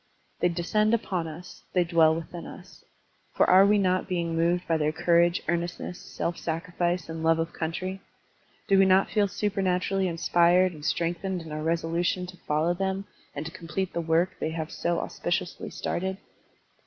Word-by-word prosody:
They 175 - +3
descend 210 +6 +1
upon 185 -7 -2
us, 165 +4 -10
they 180 - +4
dwell 165 -2 +4
within 170 +1 -7
us; - - -13 0.5
for - - +4
are 190 +2 +7
we 210 +1 +4
not 185 -2 +1
being 170 -2 -1
moved 170 +2 +1
by 165 - +2
their 155 -1 +1
courage, 170 +1 +2
earnestness, 175 +1 -2
self 175 -2 -4
sacrifice, 175 +1 -2
and 160 0 -6
love 165 0 +3
of 165 +1 -2
country? 185 +4 -4 0.7
Do 195 -1 +5
we 195 - +6
not 190 +1 +4
feel 205 -1 +3
supematurally 190 -1 0
inspired 175 +2 +3
and 150 -2 -11
strengthened 175 +3 -1
in 160 - -10
our 155 0 -4
resolution 170 +3 0
to 180 0 -11
follow 155 +3 +2
them 190 +2 -2 0.3
and 145 +2 -4
t6 165 - -7
complete 180 +2 -4
the 170 - -1
work 165 +3 +2
they - - -1
have 160 -1 -4
so 170 0 -1
auspiciously 175 0 -3
started? 190 +2 -3
175 Hz, 170 wpm, -27 LUFS, 165-185 Hz, 0.7 s, are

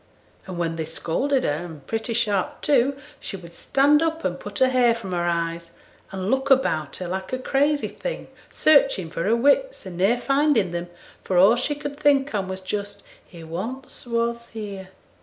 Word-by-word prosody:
And 185 -2 -6
when 165 -1 -2
they 160 - -2
scolded 250 - -1
her, 150 +3 -1
and 160 -5 -10
pretty 225 +1 -2
sharp 205 -5 0
too, 275 -1 +2 0.2
she 195 - -6
would 170 -2 -13
stand 285 - +3
up 325 0 -1
and 180 -1 -1
put 205 0 -7
her 260 - +4
hair 245 -2 +4
from 210 -5 -7
her 175 -1 -1
eyes, 170 0 -2 0.3
and 190 +1 -3
look 265 +1 0
about 160 - +2
her 180 - -5
like 190 +1 -4
a - - +1
crazy 285 +3 +1
thing - - -6 0.2
searching 235 - +3
for 165 - -3
her 220 +3 +3
wits, 285 - +2
and 180 -2 -7
ne'er 205 +6 +3
finding 275 - +2
them, 175 0 -4 0.4
for 185 - 0
all 195 +6 +7
she 270 +4 0
could 290 0 -6
think 280 -3 +3
on 195 -3 -1
was 190 0 -5
just, 200 +1 -5 0.2
"He 170 -2 -13
once 225 +12 -7
was 235 0 -1
here." 200 -4 -7
215 Hz, 190 wpm, -24 LUFS, 180-270 Hz, 0.4 s, all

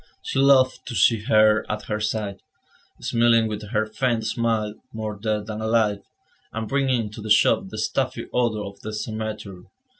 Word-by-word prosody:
She - - -2
loved 135 -2 +4
to 120 - -5
see 105 +2 +3
her 110 0 +4
at 105 - -4
her 105 0 -3
side, 105 -2 -2 0.6
smiling 115 -1 +3
with 105 -1 -6
her 110 0 +1
faint 115 +1 -1
smile, 110 -1 0 0.2
more 110 -1 -4
dead 105 0 -2
than 110 0 -5
alive, 110 -2 +2 0.5
and 110 0 -4
bringing 135 -2 +1
into 105 0 -7
the 110 - -6
shop 105 - +4
the - - -8
stuffy - - -1
odour 110 -4 0
of 100 0 -9
the 110 - -6
cemetery. 110 -4 -5
110 Hz, 170 wpm, -24 LUFS, 105-115 Hz, 0.6 s, loved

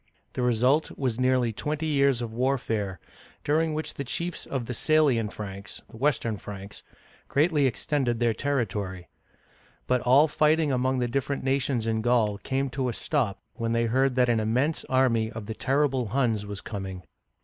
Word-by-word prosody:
The - - -3
result 125 +5 +2
was 125 -4 -1
nearly 125 -2 +2
twenty 150 +7 -3
years 140 -5 +2
of 115 -1 -6
warfare, 115 -7 -1 0.4
during 155 +1 +1
which 155 - -3
the 140 - -4
chiefs 170 +6 -2
of 130 -4 -3
the 125 - -4
Sa'lian 135 -5 +2
Franks 100 -1 -8
(Western 115 -3 0
Franks) 100 0 -9 0.5
greatly 150 -1 +3
extended 130 -2 -1
their 120 -1 +2
territory. 105 -9 -2 0.8
But 125 -1 +1
all 135 +5 +5
fighting 155 0 +2
among 130 +1 +1
the 125 -1 0
different 140 +3 -2
nations 135 -3 0
in 110 -1 0
Gaul 110 -4 +2
came 135 +4 -2
to 130 -1 -1
a - - -3
stop 120 -10 -1
when 115 -1 -2
they 115 0 +2
heard 130 +3 +2
that 125 -1 +3
an 120 -2 +2
immense 125 +9 0
army 115 -4 +2
of 110 -3 -7
the 110 - -4
terrible 135 0 +1
Huns 110 -3 0
was 100 -1 -6
coming. 95 -4 -6
125 Hz, 165 wpm, -27 LUFS, 110-140 Hz, 0.8 s, all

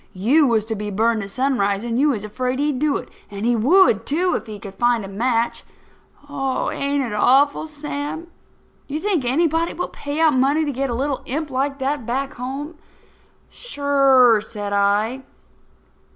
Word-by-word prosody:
You 270 +11 +3
was 225 -3 +1
to 220 - -3
be 210 -1 -4
burned 220 +2 +1
at 200 - -6
sunrise, 205 -4 0
and 235 0 -2
you 295 +2 +4
was 220 -7 -2
afraid 250 +5 -3
he'd 290 -2 0
do 300 0 +1
it. - - -8 0.2
And 205 +1 -5
he 240 0 +3
would, 245 - +4
too, 345 +8 0
if - - -4
he 215 -1 -7
could 200 -1 -10
find 240 0 +1
a - - -7
match. 230 +4 -1 0.6
Ain't 280 0 -1
it 235 -4 -4
awful, 280 +8 +3
Sam? 295 +1 -5 0.6
Do 285 - -5
you - - -1
think 370 -8 0
anybody 325 +5 +1
will 355 - -3
pay 285 +2 -5
out 320 -2 +4
money 275 +5 +2
to 290 - -1
get 275 +1 -2
a 240 - -2
little 275 +1 -2
imp 295 +2 -3
like 275 +2 -1
that 275 -2 -2
back 270 +4 -2
home?" 280 +6 -6 0.7
"Sure," 275 - +3
said 205 -2 -6
I. 205 +5 +1
265 Hz, 180 wpm, -21 LUFS, 225-290 Hz, 0.7 s, you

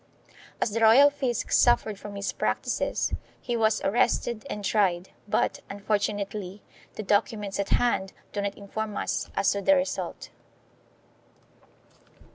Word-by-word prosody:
As 215 - 0
the 225 - -1
royal 240 +6 +7
fisc 260 -5 -2
suffered 220 -4 +3
from 205 -1 -8
his 200 0 -3
practices - - -1 0.3
he 240 - -3
was 220 -1 +2
arrested 235 +2 0
and 205 -1 -4
tried, 185 -4 +1 0.2
but, - - 0
unfor 205 +1 0
tunately, 200 -1 -4 0.3
the 215 - -5
documents 205 0 0
at 200 - -1
hand 215 -6 +1 0.2
do 205 - -1
not 200 0 -3
inform 210 +1 -5
us - - -2
as 195 - +3
to 200 - -2
the 290 +7 +5
result. 275 0 -3
210 Hz, 135 wpm, -27 LUFS, 200-230 Hz, 0.3 s, royal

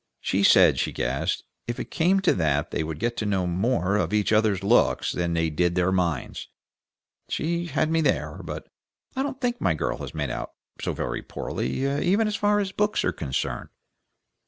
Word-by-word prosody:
She 95 - 0
said 100 - +6
she - - 0
guessed 65 +3 -1 0.2
if 120 - -3
it - - -6
came 185 +4 +3
to 190 - +4
that 75 -2 0
they - - -1
would 80 -1 -4
get 120 +6 -1
to 110 - -2
know 95 -3 +1
more 95 +2 +1
of 105 - -1
each 105 +1 +2
other's 105 -3 +2
looks 115 +5 +3
than 85 -1 -1
they 80 -1 +1
did 85 +3 +1
of - - -6
their 90 0 +2
minds. 85 -7 -1 0.8
She 170 +2 -1
had 155 0 0
me 165 0 +3
there, 155 - 0
but - - -6 0.5
I 265 - 0
don't 270 -1 -3
think 245 -1 -1
my 80 - +2
girl - - -2
has - - -7
made - - -2
out - - -5 0.3
so - - -1
very - - -3
poorly 100 - -3 0.2
even 200 +5 +3
as 210 - -1
far 205 -1 +2
as 195 -2 -1
books 210 +2 0
are - - +2
concerned." 70 -4 -3
105 Hz, 200 wpm, -25 LUFS, -, 0.8 s, said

